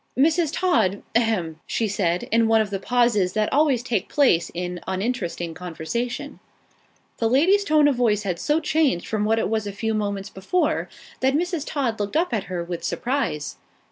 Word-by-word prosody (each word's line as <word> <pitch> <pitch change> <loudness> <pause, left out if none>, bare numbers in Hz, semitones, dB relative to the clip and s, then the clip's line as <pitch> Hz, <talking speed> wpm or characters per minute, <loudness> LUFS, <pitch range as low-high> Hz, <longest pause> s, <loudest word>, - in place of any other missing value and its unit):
"Mrs. 320 +3 +3
Todd 325 - +1
a 230 - +5
hem!" 180 -9 -1
she 225 - 0
said 180 -3 0
in 230 0 +4
one 225 0 +4
of 215 -2 0
the 195 - -2
pauses 230 -5 +2
that 215 -1 0
always 280 -4 +3
take 230 -7 -2
place 250 - +3
in 180 0 -3
uninteresting 190 -4 -2
conversation. 210 - -4 0.8
The 225 - +2
lady's 355 - +4
tone 305 -6 +4
of 280 -4 +1
voice 215 -4 +2
had 180 -4 -2
so 300 +8 +1
changed 300 - +1
from 210 -1 -1
what 220 +1 +2
it - - +1
was 220 -1 -1
a - - -3
few 220 +3 -2
moments 200 -2 -2
before, 195 - -1 0.3
that 265 +1 +2
Mrs. 340 -1 -1
Todd 255 -7 -1
looked 205 +7 -1
up 335 -5 0
at 215 -3 -1
her 180 -2 -4
with 170 0 -6
surprise. 210 - -2
225 Hz, 185 wpm, -23 LUFS, 190-275 Hz, 0.8 s, a